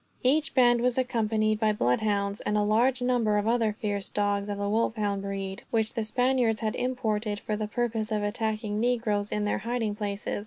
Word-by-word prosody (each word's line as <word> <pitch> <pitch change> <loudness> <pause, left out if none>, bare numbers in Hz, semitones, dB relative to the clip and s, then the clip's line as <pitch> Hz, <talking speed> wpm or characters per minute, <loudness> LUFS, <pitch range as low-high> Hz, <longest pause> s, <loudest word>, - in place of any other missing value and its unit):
Each 290 +4 +2
band 240 -2 +5
was 250 0 +1
accompanied 215 -4 +1
by 215 -1 +2
bloodhounds, 200 - 0
and 210 - 0
a 210 - +2
large 245 +5 +2
number 235 -4 +2
of 205 +1 0
other 230 -2 +2
fierce 205 -2 -3
dogs 205 0 0
of 205 - -3
the 200 0 -2
wolfhound 210 -2 0
breed, 195 -1 -4
which 220 -2 0
the 225 - -1
Spaniards 245 0 +1
had 215 -1 -1
imported 220 -5 -1
for 215 - -3
the 215 0 -3
purpose 225 -1 -2
of 210 -1 0
attacking 215 0 -2
negroes 225 -4 0
in 210 0 -1
their 210 - 0
hiding 230 -3 -2
places. 205 -1 -3
215 Hz, 190 wpm, -27 LUFS, 205-235 Hz, -, band